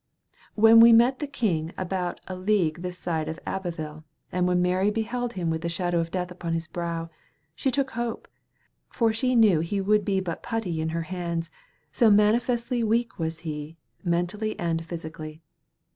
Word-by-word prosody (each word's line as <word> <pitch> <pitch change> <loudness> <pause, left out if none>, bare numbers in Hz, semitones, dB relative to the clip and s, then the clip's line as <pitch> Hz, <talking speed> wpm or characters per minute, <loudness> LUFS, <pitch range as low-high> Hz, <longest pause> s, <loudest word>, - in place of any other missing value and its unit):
When 225 +1 +7
we 230 +1 +9
met 240 +3 +5
the 295 - -3
king 180 - -1
about 185 -1 -2
a 185 - -5
league 185 -4 +1
this 180 0 -5
side 160 -4 -2
of 160 - -5
Abbeville, 160 -5 -4 0.3
and 180 0 +1
when 180 0 +2
Mary 180 +3 +2
beheld 235 +3 -2
him 175 -5 -1
with 160 0 -2
the 170 - -2
shadow 175 0 0
of 165 0 -1
death 180 0 -3
upon 175 -2 -4
his 165 0 -2
brow, 165 0 -4 0.4
she 265 - -1
took 265 +1 0
hope, 235 0 -4 0.6
for 225 -2 +1
she 255 +3 +1
knew 215 -8 +5
he 170 +5 -1
would 210 +2 +2
be 195 -1 +1
but 175 -3 -4
putty 225 -9 -2
in 160 - -1
her 165 +1 -2
hands, 170 -2 -4 0.4
so 225 +8 +4
manifestly 235 +3 +2
weak 230 0 0
was 160 0 -3
he, 150 +1 -5 0.3
mentally 180 +5 -1
and 165 -1 -1
physically. 160 -1 -7
180 Hz, 175 wpm, -26 LUFS, 165-220 Hz, 0.6 s, we